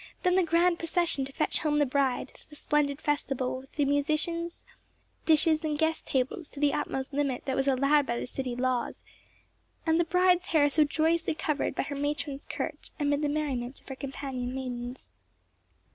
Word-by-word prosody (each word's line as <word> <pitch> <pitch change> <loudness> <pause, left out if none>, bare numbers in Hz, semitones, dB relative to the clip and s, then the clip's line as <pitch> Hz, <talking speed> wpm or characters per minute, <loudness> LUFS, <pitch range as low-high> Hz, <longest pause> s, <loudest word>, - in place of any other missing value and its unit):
—then 360 -1 +3
the 375 - +5
grand 340 +1 +3
procession 330 -4 +1
to 275 - -9
fetch 305 - +1
home 300 -1 +1
the 295 - +4
bride, 265 -1 0 0.2
the 300 - -12
splendid 295 -1 +1
festival 270 -3 -1
with 265 0 -16
the 290 - +1
musicians, 310 +4 0 0.6
dishes, 315 0 +4
and 305 -1 -1
guest 320 +1 0
tables 265 +5 -1
to 280 - -10
the 290 -1 +3
utmost 265 +1 -3
limit 275 -3 -1
that 265 - -1
was 270 +1 0
allowed 275 +2 +4
by 235 0 -1
the - - -3
city 255 -1 -4
laws, 250 -1 -1 0.8
and 325 0 +3
the - - +5
bride's 360 +1 +3
hair 290 -3 +3
so 310 +2 +5
joyously 320 +2 +1
covered 300 -3 -1
by - - 0
her 285 +1 -5
matron's 285 0 -3
curch - - -4
amid 290 0 +1
the 295 - +1
merriment 275 -4 -2
of - - -27
her 265 - -5
companion 265 -2 -5
maidens. 250 -1 -5
290 Hz, 180 wpm, -29 LUFS, 265-315 Hz, 0.8 s, the